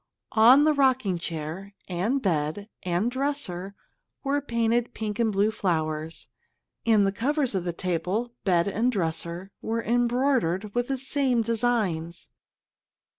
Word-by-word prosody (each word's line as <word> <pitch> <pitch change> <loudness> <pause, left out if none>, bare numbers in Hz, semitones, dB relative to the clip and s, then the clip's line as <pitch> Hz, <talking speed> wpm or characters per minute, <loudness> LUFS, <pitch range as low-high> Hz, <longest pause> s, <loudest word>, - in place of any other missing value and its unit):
On 245 +6 +7
the 310 0 +4
rocking 260 - +2
chair, 170 +4 -6
and 205 +10 -1
bed, 165 +2 -1
and 180 +6 0
dresser 245 -9 -3 0.5
were 285 +1 0
painted 235 -2 0
pink 215 -1 -4
and 225 -2 +2
blue 205 +2 +2
flowers, 160 -5 -2 0.6
and 215 -3 +5
the 195 - +2
covers 265 +5 0
of 185 -2 -1
the 175 - 0
table, 185 +7 -2
bed 175 -3 +2
and 225 +5 +1
dresser 170 -1 -3
were 230 +1 -2
embroidered 240 -5 +1
with 245 0 0
the 270 - -1
same 260 -2 +1
designs. 215 -8 -1
215 Hz, 130 wpm, -26 LUFS, 175-245 Hz, 0.6 s, On